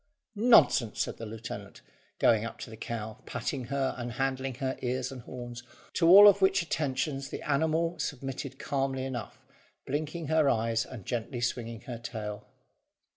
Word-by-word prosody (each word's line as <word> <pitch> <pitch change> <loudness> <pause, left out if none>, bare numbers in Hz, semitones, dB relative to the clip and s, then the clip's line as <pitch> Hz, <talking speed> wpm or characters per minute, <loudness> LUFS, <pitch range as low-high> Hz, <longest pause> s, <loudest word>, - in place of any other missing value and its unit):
"Nonsense!" 215 - +5
said - - -1
the 115 - -6
lieutenant, 115 +1 -8 0.4
going 110 -2 +4
up 115 - -6
to 115 - -7
the - - -8
cow, 110 -1 -5
patting 130 -4 -3
her 135 +1 -1
and 120 -1 -4
handling 135 +1 -1
her 130 +1 -2
ears 130 +1 -2
and 130 -2 -8
horns; 120 0 -8 0.3
to 165 - +3
all 200 +3 +11
of 200 -1 +6
which 190 -1 +4
attentions 140 -3 -2
the - - -6
animal 160 +3 +1
submitted 135 -1 -4
calmly 135 -2 -1
enough, 125 -4 -5 0.5
blinking 155 +4 -3
her 155 -1 +3
eyes, 115 0 +1
and 115 -8 -9
gently 120 +1 -3
swinging 115 -1 -2
her 120 -4 -7
tail. 110 -3 -6
130 Hz, 160 wpm, -29 LUFS, 115-145 Hz, 0.5 s, all